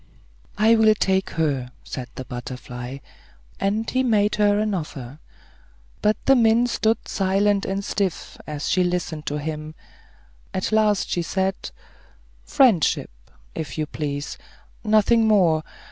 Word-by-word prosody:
"I 220 Hz, +2 st, +5 dB
will 220 Hz, -1 st, +5 dB
take 190 Hz, -1 st, +1 dB
her," 140 Hz, -6 st, -1 dB
said 125 Hz, -1 st, -6 dB
the 130 Hz, -, -6 dB
butterfly; 125 Hz, +1 st, -7 dB, 0.6 s
and 210 Hz, +3 st, 0 dB
he 260 Hz, -, +1 dB
made 215 Hz, -5 st, +2 dB
her 205 Hz, -1 st, +3 dB
an 215 Hz, 0 st, 0 dB
offer. 145 Hz, -6 st, -6 dB, 0.8 s
But 210 Hz, 0 st, +2 dB
the 270 Hz, -, +6 dB
mint 235 Hz, 0 st, +3 dB
stood 220 Hz, +1 st, 0 dB
silent 195 Hz, +1 st, +1 dB
and 195 Hz, +1 st, -3 dB
stiff, 195 Hz, -4 st, -2 dB
as 150 Hz, -1 st, -4 dB
she 185 Hz, -, +2 dB
listened 175 Hz, -4 st, -2 dB
to 145 Hz, -, -1 dB
him. 155 Hz, +1 st, -5 dB, 0.8 s
At 185 Hz, -, -1 dB
last 215 Hz, -2 st, +2 dB
she 175 Hz, -, 0 dB
said, 190 Hz, +3 st, -2 dB, 0.7 s
"Friendship, 245 Hz, -, +3 dB, 0.4 s
if 155 Hz, -3 st, -5 dB
you 155 Hz, -, 0 dB
please; 145 Hz, -1 st, -5 dB, 0.4 s
nothing 220 Hz, +1 st, +4 dB
more. 175 Hz, -7 st, +4 dB
190 Hz, 130 wpm, -23 LUFS, 150-215 Hz, 0.8 s, the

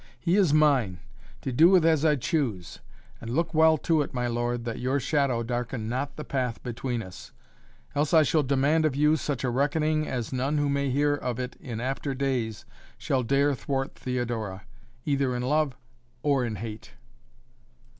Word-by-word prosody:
"He 175 Hz, +1 st, +1 dB
is 195 Hz, -7 st, +4 dB
mine, 135 Hz, -, +3 dB, 0.4 s
to 130 Hz, -, -3 dB
do 160 Hz, +8 st, +6 dB
with 185 Hz, -4 st, +5 dB
as 160 Hz, -2 st, +3 dB
I 155 Hz, -2 st, +4 dB
choose, 120 Hz, -, -2 dB, 0.4 s
and 115 Hz, -, -7 dB
look 165 Hz, +6 st, -1 dB
well 160 Hz, 0 st, +5 dB
to 160 Hz, +1 st, +1 dB
it, 140 Hz, -, -5 dB
my 125 Hz, 0 st, -1 dB
lord, 120 Hz, 0 st, -2 dB
that 115 Hz, -1 st, -4 dB
your 130 Hz, +3 st, 0 dB
shadow 135 Hz, -3 st, +1 dB
darken 120 Hz, -1 st, -3 dB
not 130 Hz, +4 st, -3 dB
the 150 Hz, -, -6 dB
path 125 Hz, -5 st, -3 dB
between 120 Hz, -1 st, -3 dB
us. 95 Hz, -1 st, -11 dB, 0.6 s
Else 145 Hz, +1 st, 0 dB
I 160 Hz, -2 st, +6 dB
shall 155 Hz, +1 st, +2 dB
demand 145 Hz, +3 st, +2 dB
of 155 Hz, -4 st, +1 dB
you 150 Hz, +2 st, +4 dB
such 145 Hz, -5 st, -3 dB
a 125 Hz, -, 0 dB
reckoning 155 Hz, +4 st, +1 dB
as 125 Hz, -2 st, -3 dB
none 135 Hz, +4 st, 0 dB
who 145 Hz, -1 st, +1 dB
may 140 Hz, 0 st, 0 dB
hear 145 Hz, +3 st, +2 dB
of 125 Hz, -4 st, -3 dB
it 125 Hz, 0 st, -4 dB
in 115 Hz, -4 st, -6 dB
after 135 Hz, +2 st, -3 dB
days 125 Hz, -6 st, -2 dB, 0.3 s
shall 130 Hz, -, 0 dB
dare 140 Hz, +4 st, +2 dB
thwart 135 Hz, +1 st, -3 dB
Theodora 115 Hz, -6 st, -3 dB, 0.4 s
either 140 Hz, -3 st, +1 dB
in 125 Hz, -, -2 dB
love 145 Hz, 0 st, +1 dB, 0.5 s
or 140 Hz, -3 st, +2 dB
in 110 Hz, -2 st, -3 dB
hate." 110 Hz, +1 st, -8 dB
135 Hz, 180 wpm, -27 LUFS, 120-150 Hz, 0.6 s, do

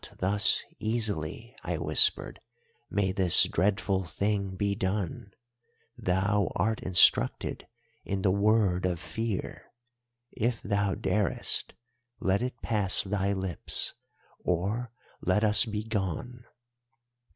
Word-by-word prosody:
"'Not -, -, -13 dB
thus 100 Hz, +3 st, +2 dB, 0.2 s
easily,' 110 Hz, -1 st, -2 dB
I -, -, -2 dB
whispered, -, -, +3 dB, 0.5 s
'may 100 Hz, -2 st, 0 dB
this 95 Hz, -3 st, +5 dB
dreadful 95 Hz, +1 st, 0 dB
thing 100 Hz, +2 st, -2 dB
be 100 Hz, +1 st, 0 dB
done. 100 Hz, -1 st, -3 dB, 0.7 s
Thou 100 Hz, +2 st, 0 dB
art 110 Hz, +5 st, 0 dB
instructed 85 Hz, -9 st, +3 dB, 0.4 s
in 95 Hz, -1 st, -3 dB
the 95 Hz, -, +3 dB
Word 100 Hz, -3 st, +2 dB
of 90 Hz, -2 st, -2 dB
Fear. 110 Hz, +2 st, -5 dB, 0.6 s
If 120 Hz, -1 st, -1 dB
thou 100 Hz, -1 st, 0 dB
darest, 105 Hz, -2 st, -1 dB, 0.4 s
let 95 Hz, +2 st, +1 dB
it 125 Hz, -1 st, -5 dB
pass 105 Hz, -5 st, +1 dB
thy 100 Hz, 0 st, -1 dB
lips, 95 Hz, -2 st, -1 dB, 0.5 s
or 100 Hz, +7 st, -2 dB, 0.3 s
let 95 Hz, +4 st, +1 dB
us 105 Hz, -1 st, +6 dB
be 110 Hz, -1 st, -4 dB
gone. 110 Hz, +3 st, -4 dB
100 Hz, 110 wpm, -28 LUFS, 95-110 Hz, 0.7 s, us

